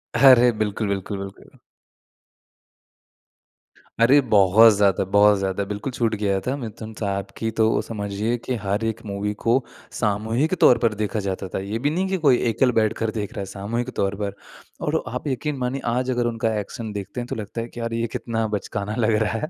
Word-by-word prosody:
अरे 125 -1 +7
बिल्कुल, 105 0 -1
बिल्कुल, 100 +1 -3
बिल्कुल। 100 0 -10 2.4
अरे! 130 +5 +6
बहुत 110 -1 +6
ज़्यादा, 100 -2 +2
बहुत 100 +1 +5
ज़्यादा 95 +1 -1
बिल्कुल 105 +6 -4
छूट 115 -2 0
गया 100 -2 0
था। 130 +7 -2
मिथुन 110 -3 -7
साहब 100 -2 -2
की 115 - -1
तो 110 0 +3
समझिए 105 +2 -3
कि 130 - -1
हर 100 +3 -1
एक 115 +1 -3
मूवी 100 0 -3
को 115 - +4 0.4
सामूहिक 110 - 0
तौर 125 - +7
पर 115 -1 +1
देखा 105 0 -2
जाता 95 -1 -3
था। - - -1
ये 100 +4 -4
भी 140 +4 +1
नहीं 180 +5 -1
कि 190 - 0
कोई 130 -3 +6
एकल 125 +3 +2
बैठकर 110 0 0
देख 105 0 -4
रहा 115 - -6
है - - -4
सामूहिक 105 +5 -4
तौर 100 0 0
पर 100 -1 -2 0.5
और - - +1
आप 125 +6 -5
यकीन 145 +2 -2
मानिए 130 +1 -2
आज 130 +1 -1
अगर 120 -1 0
उनका 115 -1 -1
एक्शन 110 +2 -6
देखते 100 +4 -5
हैं 120 - -6
तो - - -4
लगता 110 +2 -5
है 115 - -5
कि 120 - -11
यार 115 0 -3
ये 115 0 -1
कितना 115 -1 -2
बचकाना 100 +1 -4
लग 110 -2 +2
रहा 105 - -1
है 155 - -4
110 Hz, 195 wpm, -23 LUFS, 100-120 Hz, 2.4 s, अरे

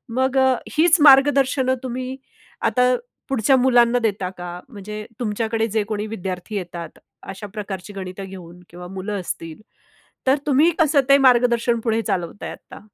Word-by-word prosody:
मग 260 +1 +1
अ, 260 -1 +4 0.2
हीच 330 +1 +5
मार्गदर्शनं 270 -2 +5
तुम्ही 255 +1 -5 0.5
आता 250 0 +3 0.4
पुढच्या 265 0 +3
मुलांना 245 -1 +4
देता 200 -5 -1
का? 175 0 -7
म्हणजे 210 -1 -8
तुमच्याकडे 225 0 -1
जे 220 -2 +1
कोणी 215 -1 -3
विद्यार्थी 190 -1 -5
येतात, 175 -3 -6 0.3
अशा 195 +2 -8
प्रकारची 205 -2 -6
गणितं 190 0 -7
घेऊन, 180 -2 -11
किंवा 175 +1 -10
मुलं 195 +2 -5
असतील, 165 0 -7 0.7
तर 265 +2 +4
तुम्ही 295 +5 +4
कसं 300 -3 +4
ते 275 - +8
मार्गदर्शन 240 -2 +3
पुढे 225 -1 +1
चालवताय 190 -2 -3
आत्ता? - - -12
225 Hz, 145 wpm, -21 LUFS, 195-260 Hz, 0.7 s, ते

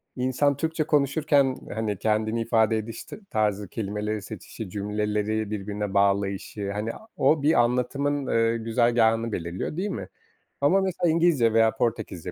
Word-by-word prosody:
insan 130 +2 +1
Türkçe 160 +1 -1
konuşurken, 145 -2 +2 0.2
hani, 110 -2 -2
kendini 110 +1 0
ifade 110 -1 +2
ediş 110 +1 -6
t - - -10
tarzı, 105 -2 0
kelimeleri 105 +1 -3
seçişi, 105 0 -8
cümleleri 105 +1 -2
birbirine 105 0 -4
bağlayışı, 100 0 0
hani, 105 +2 -3
a 220 - -13
o 145 +3 +3
bir 155 - +4
anlatımın, 135 +4 0
ııı, 115 0 +2
güzergâhını 115 0 +2
belirliyor 85 - -4
değil 195 +3 -1
mi? 95 - -5 0.5
Ama, 180 +8 +4
mesela, 175 -2 0
İngilizce 155 -9 +3
veya 115 0 +4
Portekizce 105 -7 -2
115 Hz, 140 wpm, -25 LUFS, 105-140 Hz, 0.5 s, bir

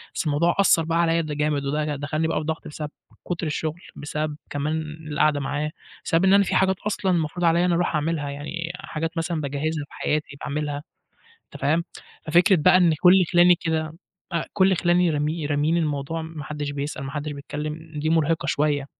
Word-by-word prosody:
بس - - -1
الموضوع 155 +3 +2
أثّر 170 -4 +5
بقى 165 +1 0
عليَّ 165 0 +2
ده 155 -2 -4
جامد، 150 -1 0
وده 150 +1 -1
دخلّني 155 +3 -1
بقى - - -1
في - - -4
ضغط 160 0 -3
بسب 150 0 -6 0.4
كُتر 170 -2 -2
الشغل، 155 +3 -3
بسبب 150 0 -3
كمان 150 +2 -1 0.3
القعدة 150 0 +2
معاه، 145 +2 -2 0.3
بسبب 165 +3 +2
إن 190 - +5
أنا 200 0 +6
في - - -1
حاجات 190 0 +3
أصلًا 195 -2 0
المفروض 170 0 0
عليَّ 165 +1 +4
إن 180 - +3
أنا 175 - +2
أروح 175 -2 0
اعملها، 150 -1 -1
يعني 165 +4 -5
حاجات 165 -2 -5
مثلًا 165 -1 -1
باجهِزها 145 +2 -2
في - - -20
حياتي، 150 -2 -2
باعمِلها، 145 0 -3 0.7
أنت - - -10
فاهِم، 160 +4 +2 0.4
ففكرة 180 +5 +5
بقى 160 +3 +5
إن 175 -3 +4
كل 185 +1 +7
خِلاني 175 0 +7
كده 160 -2 -2 0.4
أ 170 - 0
كل 190 -2 +3
خِلاني 175 0 +3
رامي 150 +1 -1
راميين 150 +3 +1
الموضوع، 155 0 -1
ما 160 -2 -7
حدِش 145 0 -4
بيسأل، 140 0 -4
ما 135 - -5
حدِش 150 +1 -4
بيتكلم 150 +3 -6
دي 150 +1 -1
مُرهقة 165 0 +1
شوية، 145 -1 +1
155 Hz, 195 wpm, -24 LUFS, 150-170 Hz, 0.7 s, كل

